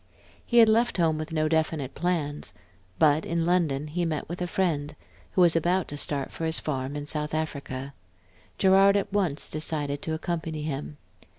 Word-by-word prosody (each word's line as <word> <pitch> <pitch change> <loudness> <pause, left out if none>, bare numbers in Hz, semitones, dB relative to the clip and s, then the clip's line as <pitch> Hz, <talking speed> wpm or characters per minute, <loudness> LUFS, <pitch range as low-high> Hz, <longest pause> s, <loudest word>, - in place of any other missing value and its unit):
He 240 - 0
had 230 -1 +9
left 230 +1 +3
home 160 -3 +2
with 155 +1 -5
no 155 -1 +1
definite 155 -4 0
plans; 155 -3 -2 0.4
but 155 0 +4
in 170 -1 -1
London 165 -5 +1
he 165 +4 -2
met 160 -3 -2
a 175 +1 -3
friend, 155 -5 -1 0.4
who 185 - +3
was 170 -2 +5
about 175 +3 +1
to 145 - -5
start 145 -1 -2
for 165 - -4
his 160 0 0
farm 135 -1 -3
in 145 0 -4
South 150 0 -2
Africa. 140 -3 -4 0.6
Gerard 195 +1 +5
at 200 0 -2
once 180 -8 0
decided 145 -2 -2
to 160 - -2
accompany 160 -2 -3
him. 150 0 -4
160 Hz, 175 wpm, -27 LUFS, 145-175 Hz, 0.6 s, had